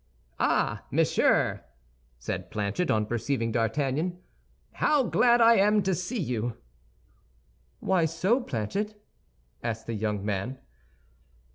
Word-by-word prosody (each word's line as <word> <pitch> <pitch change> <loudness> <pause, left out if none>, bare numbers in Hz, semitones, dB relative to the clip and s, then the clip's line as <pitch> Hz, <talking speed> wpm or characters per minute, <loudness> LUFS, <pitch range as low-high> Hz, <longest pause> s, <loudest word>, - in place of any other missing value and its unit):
"Ah, - - +1
monsieur," - - +2 0.5
said - - -5
Planchet, 105 - -2
on 110 -1 +2
perceiving 115 +1 -1
D'Artagnan, 135 - 0 0.5
"how 300 -3 +2
glad 240 0 +4
I 230 0 +7
am 210 +1 +4
to 190 0 +1
see 180 +7 -3
you." 120 - -2 1.2
"Why 185 -3 +2
so, 185 - +1
Planchet?" 205 - -3 0.6
asked 115 -1 -4
the 115 - -4
young 105 -2 -2
man. 105 +6 -2
140 Hz, 110 wpm, -27 LUFS, -, 1.2 s, I